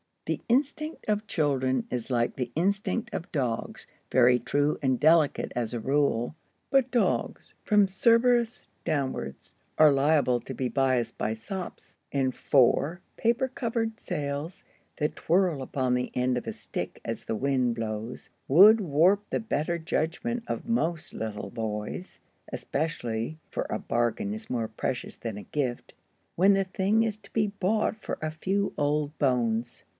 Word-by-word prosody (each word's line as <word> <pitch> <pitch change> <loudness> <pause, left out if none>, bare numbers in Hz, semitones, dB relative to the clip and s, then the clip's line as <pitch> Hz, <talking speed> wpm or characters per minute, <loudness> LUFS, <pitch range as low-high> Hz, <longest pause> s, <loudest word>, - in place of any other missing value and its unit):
The - - -2
instinct 295 +5 0
of 210 0 0
children 130 -5 +1
is 125 -1 -3
like 120 -2 +1
the 125 -2 -3
instinct 200 +7 0
of 175 - -5
dogs, 125 -6 -2 0.3
very 125 -1 +5
true 145 +5 0
and 130 -3 +1
delicate 155 -1 +3
as 120 -2 -2
a 120 - -2
rule. 135 0 +1 0.4
But 270 -2 +4
dogs, 245 -2 0
from 210 -2 +4
Cerberus 235 +4 +3 0.2
downwards, 135 - -3 0.2
are 155 -1 +7
liable 140 -3 +3
to 130 - -8
be 125 0 -2
biassed 130 -1 +1
by 110 - -1
sops. 180 - -7
And 135 -2 +1
four 140 +7 +2 0.2
paper 235 +3 +2
covered 230 -3 -2
sails, 145 +4 -4 0.3
that 150 0 -1
twirl 175 -4 +2
upon 130 -1 -1
the 125 0 -1
end 125 0 +1
of 125 - -5
a - - -2
stick - - -6
as - - -4
the 110 - -2
wind 130 -1 +1
blows, 110 +1 -5 0.2
would 200 +10 +8
warp 185 +5 +3
the - - 0
better 170 -6 -1
judgment 175 +9 -2
of - - -4
most 170 -7 -1
little 110 -2 -5
boys, 110 - -5 0.3
especially 125 -3 -3
(for - - -3
a - - -1
bargain 120 - -1
is 220 +1 -8
more 115 -3 -1
precious 120 +2 -4
than 115 -3 -5
a 105 - -7
gift) 130 -5 -3 0.4
when 195 +3 +5
the 195 0 +3
thing 195 +3 +1
is 220 -2 -2
to 200 -2 -20
be 215 -2 +2
bought 205 +2 0
for - - -4
a 155 0 -2
few 195 +5 -1
old 150 +1 0
bones. 120 -4 0
150 Hz, 155 wpm, -28 LUFS, 125-200 Hz, 0.4 s, would